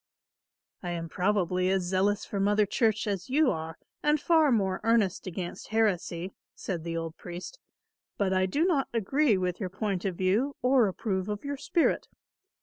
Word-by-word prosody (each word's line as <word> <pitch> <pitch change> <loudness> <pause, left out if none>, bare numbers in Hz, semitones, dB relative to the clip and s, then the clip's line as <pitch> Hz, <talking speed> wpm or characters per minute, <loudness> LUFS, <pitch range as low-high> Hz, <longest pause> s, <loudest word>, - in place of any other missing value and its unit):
"I 180 - -4
am 165 -1 -4
probably 185 0 +1
as 190 -1 +1
zealous 195 +3 +1
for 200 - -4
Mother 205 +1 +3
Church 220 +1 +1
as 200 -2 -3
you 290 +1 +3
are 160 0 -5 0.2
and 300 +1 +2
far 315 -2 +4
more 190 -5 +1
earnest 225 -5 +2
against 180 0 -5
heresy," 190 -5 0 0.2
said 175 -4 -4
the 165 0 -3
old 165 -1 -5
priest, 180 - -8 0.6
"but 195 -2 +1
I 185 0 +2
do 295 - +1
not 305 -8 +2
agree 235 +2 +2
with 180 -1 -2
your 190 -4 -3
point 190 -1 -2
of 190 -3 -1
view 210 +11 +1
or 250 -3 +4
approve 190 0 -2
of 210 +5 -4
your 285 0 -2
spirit. 315 +4 +1
195 Hz, 170 wpm, -28 LUFS, 180-230 Hz, 0.6 s, far